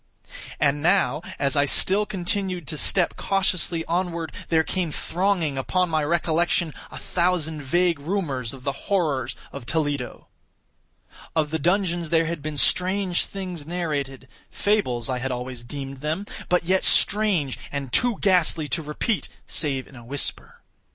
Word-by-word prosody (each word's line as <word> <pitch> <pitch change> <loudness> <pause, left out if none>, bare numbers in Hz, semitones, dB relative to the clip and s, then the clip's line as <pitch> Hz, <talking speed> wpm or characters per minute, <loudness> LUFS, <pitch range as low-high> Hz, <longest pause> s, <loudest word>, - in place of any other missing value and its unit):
And 145 0 +2
now, 160 -5 +3 0.2
as 140 +1 0
I 145 0 +4
still 200 +8 +2
continued 185 -3 -1
to 160 - -2
step 180 -3 +2
cautiously 185 -4 +1
onward, 170 -1 -1 0.2
there 160 -1 +4
came 180 0 -1
thronging 170 -4 0
upon 180 +5 +1
my 155 -1 +2
recollection 170 +1 +1 0.2
a - - -9
thousand 170 -4 0
vague 170 +3 +2
rumors 140 - -1
of 130 -2 -10
the 140 - 0 0.2
horrors 145 - +1 0.2
of 120 - -8
Toledo. 145 -5 -2 1.1
Of 155 -2 +1
the 160 - 0
dungeons 175 0 +1
there 165 0 +3
had 165 -2 -3
been 150 0 -4
strange 185 +5 +2
things 180 -6 -6
narrated—fables 145 - -2
I 130 -1 -1
had 130 +1 -2
always 125 -1 -5
deemed 135 +2 -6
them—but 180 +3 -1
yet 185 +2 +2
strange, 195 -10 +3
and 140 -3 -4
too 245 -3 +3
ghastly 175 -5 +3
to 165 - 0
repeat, 155 +8 -2 0.2
save 135 -4 0
in 140 - -16
a 120 - -11
whisper. 140 +4 -3
160 Hz, 145 wpm, -24 LUFS, 140-180 Hz, 1.1 s, I